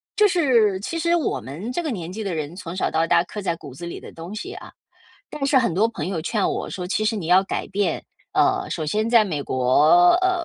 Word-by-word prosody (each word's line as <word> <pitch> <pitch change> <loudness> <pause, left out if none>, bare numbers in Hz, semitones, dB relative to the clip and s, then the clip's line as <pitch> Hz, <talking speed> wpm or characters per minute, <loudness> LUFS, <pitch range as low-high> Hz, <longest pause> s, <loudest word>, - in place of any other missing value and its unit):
就 425 - +5
是 240 - +3
其 280 - -4
实 340 +1 +2
我 315 - -1
们 160 - -7
这 345 - -2
个 310 - -2
年 175 -7 -5
纪 215 +4 -5
的 195 - -3
人 155 +1 -4
从 175 -3 -7
小 185 - -1
到 160 +1 +1
大 165 - +4
刻 210 - -7
在 185 -3 -1
骨 140 -5 -11
子 170 - -8
里 170 - -6
的 - - -12
东 165 +4 -8
西 375 - -6
啊。 - - -10 0.6
但 295 -2 -2
是 275 0 +2
很 235 -8 +1
多 205 +7 +3
朋 230 -5 -5
友 185 -4 -2
劝 200 +5 0
我 - - -3
说： 180 - -5
“其 215 +3 0
实 215 - +1
你 185 -6 -4
要 180 +2 +6
改 - - -3
变。 195 -5 -1 0.3
呃， - - +2
首 155 - -3
先 215 +9 0
在 230 -2 +5
美 155 -7 -3
国， 145 +7 +4
呃， 365 -2 +1
195 Hz, 270 characters per minute, -23 LUFS, 165-235 Hz, 0.6 s, 要